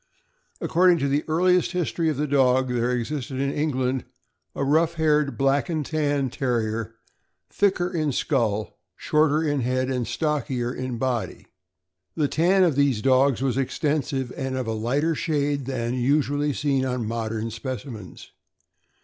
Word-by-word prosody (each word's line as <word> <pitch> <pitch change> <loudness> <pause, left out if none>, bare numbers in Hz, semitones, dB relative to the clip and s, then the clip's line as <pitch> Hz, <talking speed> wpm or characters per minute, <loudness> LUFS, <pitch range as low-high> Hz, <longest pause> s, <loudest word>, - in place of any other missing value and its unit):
According 180 0 +4
to 140 -3 0
the 145 +2 +1
earliest 180 +3 +2
his 180 -3 -1
tory 165 -2 0
of 150 - -2
the 150 - 0
dog, 130 -2 +3
there 120 0 0
existed 130 +2 -3
in 140 0 0
England 130 -4 -1 0.5
a - - -1
rough 160 +4 +2
haired 150 -3 +1
Black 135 +4 +1
and 155 -3 -1
Tan 145 -4 0
Terrier 115 -4 -2 0.6
thicker 190 -3 +1
in 160 -5 -1
skull, 110 - -1 0.2
shorter 155 0 +2
in 145 -3 0
head, 130 +2 0
and 125 -3 -2
stockier 130 -3 -1
in 130 -2 -4
body. 125 -2 -2 0.7
The 150 -3 +1
tan 180 +6 +3
of 165 -6 +2
these 140 -6 +2
dogs 135 -1 +3
was 130 -2 0
extensive, 135 -2 -1
and 135 -1 -3
of 130 - -2
a 115 - -2
lighter 135 +9 0
shade 145 -4 -1
than 120 -3 -2
that 125 - -2
usually 145 +2 +1
seen 140 -1 0
on 125 -3 -2
modern 115 0 -3
specimens. 115 -3 -7
135 Hz, 155 wpm, -24 LUFS, 125-150 Hz, 0.7 s, According